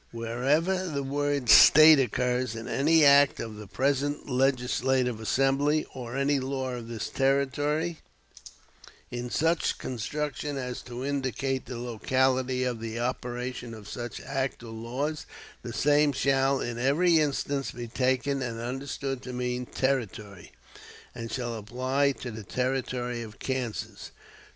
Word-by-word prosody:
Wherever 140 +11 0
the 140 -4 -2
word 145 -1 -1
'State' 155 +5 +9
occurs 125 -1 0
in 115 0 -6
any 155 +2 +4
act 140 0 +6
of 110 -2 -6
the 105 -1 -9
present 140 +6 -1
legislative 130 -2 +1
assembly, 135 +6 +1
or 125 0 -6
any 140 0 +2
law 130 0 -3
of 120 -2 -6
this 115 -2 -4
Territory, 145 +4 0 1.1
in 120 0 -4
such 165 +5 +1
construction 145 +3 -4
as 125 -2 -4
to 125 +1 -7
indicate 135 -1 -2
the 125 - -6
locality 130 +2 0
of 125 -3 -2
the 115 0 -5
operation 125 -1 -4
of 105 -2 -12
such 120 +1 -6
act 135 -3 -3
or 115 - -9
laws, 130 +7 -4 0.3
the 120 - -6
same 145 +5 +3
shall 135 0 +2
in 120 0 -4
every 160 +6 +3
instance 140 -2 -1
be 120 0 -7
taken 130 +3 0
and 120 -3 -4
understood 135 +2 -4
to 125 - -7
mean 125 0 -3
'Territory,' 110 -8 -3 0.6
and 115 -1 -7
shall 120 -1 -3
apply 130 +6 0
to 125 -2 -7
the 110 0 -8
Territory 125 0 -2
of 110 -2 -9
Kansas." 130 -4 -4
130 Hz, 135 wpm, -28 LUFS, 120-140 Hz, 1.1 s, State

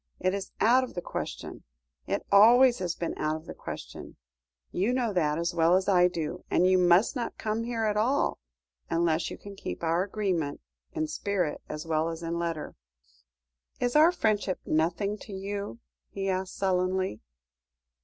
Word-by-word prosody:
It 185 +1 +1
is 200 -1 -4
out 250 +4 +5
of 255 - -7
the 175 - -2
question. - - -6 0.4
It - - -2
always 240 +5 +7
has 180 -2 -2
been 170 - -3
out 155 0 0
of 160 +1 -8
the - - -7
question. - - -8 0.6
You 205 +7 0
know 240 -4 0
that 155 -4 +1
as 170 +1 -1
well 170 +1 +4
as 190 0 +1
I 180 -3 +5
do, 175 0 -4
and 180 - +3
you 185 0 +4
must 180 +8 +4
not 245 -2 -3
come 220 +1 -2
here 235 -2 -2
at 210 -1 +1
all, 245 +7 +1 0.5
unless 165 -1 +1
you - - -7
can 200 0 -10
keep 90 - -6
to - - -2
our 165 +2 +2
agreement 190 -7 -1 0.3
in 155 - -1
spirit 175 +1 -2
as 150 +1 -5
well 160 0 0
as 165 0 -6
in 170 +1 -2
letter." 165 -3 -3 1.1
"Is 245 +1 0
our 315 +3 +7
friendship 210 - 0
nothing 175 +7 0
to 205 - -10
you?" 200 - -5 0.3
he 195 0 -3
asked 185 0 -2
sullenly. 185 - 0
185 Hz, 175 wpm, -28 LUFS, 165-210 Hz, 1.1 s, always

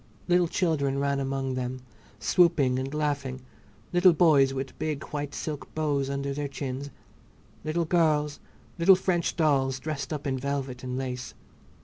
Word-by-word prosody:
Little 175 -1 +4
children 150 -6 0
ran 140 0 0
among 135 -1 -2
them, 130 0 -3 0.4
swooping 140 - +3
and 135 +1 -3
laughing; 140 -3 -2 0.5
little 175 0 +6
boys 150 -5 +5
with 135 0 -5
big 155 -2 -2
white 145 -1 -4
silk 150 -2 -5
bows 145 -3 0
under 140 0 -2
their 145 +1 -3
chins, 140 0 -5 0.7
little 160 +2 0
girls, 155 -3 +2 0.4
little 190 +3 +7
French 180 -2 0
dolls, 135 -5 +2
dressed 155 +1 -4
up 150 -1 -4
in 135 -2 -1
velvet 135 -2 -3
and 125 0 -3
lace. 125 -1 -4
140 Hz, 145 wpm, -27 LUFS, 135-155 Hz, 0.7 s, little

